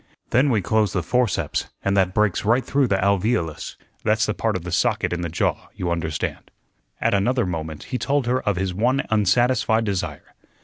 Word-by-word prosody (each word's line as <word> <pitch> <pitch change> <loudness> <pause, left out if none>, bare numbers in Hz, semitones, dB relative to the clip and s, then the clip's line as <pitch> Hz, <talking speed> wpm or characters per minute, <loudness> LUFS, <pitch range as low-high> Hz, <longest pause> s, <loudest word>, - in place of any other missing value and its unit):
Then 130 +4 +4
we 110 -7 +1
close 110 0 +1
the 90 - 0
forceps, 125 +2 0 0.2
and 100 0 +2
that 95 -2 +2
breaks 105 -4 +2
right 120 +4 +2
through 135 0 +2
the 100 - +1
alveolus 100 -3 0 0.3
that's 110 +1 +2
the 105 - -1
part 110 -1 -1
of 90 - -3
the 90 - -6
socket 85 - +1
in 85 - -2
the 85 - -3
jaw, 85 - -1
you 90 -2 -2
understand." 80 -3 -3 0.5
At - - +1
another 120 +4 +2
moment 80 -3 -4
he 125 - -4
told 140 -2 0
her 125 +2 +1
of 105 - 0
his 95 0 -2
one 125 +8 +1
unsatisfied 110 +2 +3
desire. 100 -3 -4
105 Hz, 190 wpm, -23 LUFS, 90-120 Hz, 0.5 s, Then